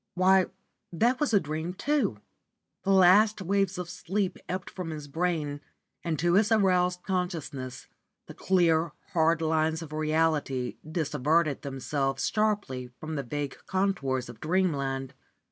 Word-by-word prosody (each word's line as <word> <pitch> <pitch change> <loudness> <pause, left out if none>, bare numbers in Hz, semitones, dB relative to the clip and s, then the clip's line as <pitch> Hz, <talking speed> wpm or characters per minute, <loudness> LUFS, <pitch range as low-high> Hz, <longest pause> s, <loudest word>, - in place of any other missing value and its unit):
why, 185 +1 +4 0.4
that 235 +9 +2
was 295 - +1
a 205 - +5
dream 160 +2 -4
too! 260 - 0 0.6
The - - -3
last 195 +3 +6
waves 195 0 0
of 180 -1 -4
sleep 185 +2 -2
ebbed 185 0 -3
from 180 -3 -5
his 150 -2 -6
brain 155 -2 -1 0.4
and 165 -2 -1
to 175 +2 +2
his 210 +4 +4
aroused 180 -4 +3
consciousness 160 -9 -3 0.4
the - - -10
clear, 170 -4 +2 0.2
hard 165 -1 +3
lines 160 +1 +1
of 155 -1 -10
reality 155 -4 0
dissevered 155 -1 0
themselves 135 0 -2
sharply 205 - 0
from 155 0 -6
the 145 - -1
vague 140 +2 -4
contours 180 -10 0
of 120 -2 -11
dreamland. 140 -6 0
165 Hz, 135 wpm, -28 LUFS, 145-185 Hz, 0.6 s, last